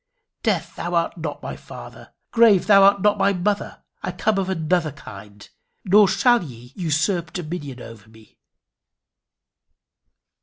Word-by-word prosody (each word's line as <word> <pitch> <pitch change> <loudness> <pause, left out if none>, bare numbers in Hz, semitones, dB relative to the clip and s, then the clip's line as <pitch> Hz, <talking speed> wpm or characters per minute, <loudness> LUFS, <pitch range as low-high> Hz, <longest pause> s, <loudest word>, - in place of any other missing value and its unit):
Death, 175 -6 -2
thou 175 0 -3
art 170 0 0
not 160 -4 -6
my - - -5
father! - - -12 0.2
Grave, 225 -5 +4
thou 200 -2 +6
art 200 0 +4
not 210 0 +2
my 200 - +3
mother! 200 +3 -3 0.2
I - - -3
come 195 +3 0
of 190 -1 -2
another 165 -2 0
kind, 100 0 -13 0.4
nor 200 +2 +6
shall 240 +3 +3
ye 125 -3 -12
usurp 170 0 -1
dominion 155 -7 -6
over 110 -2 -13
me." 110 -1 -21
175 Hz, 140 wpm, -22 LUFS, 150-200 Hz, 0.4 s, thou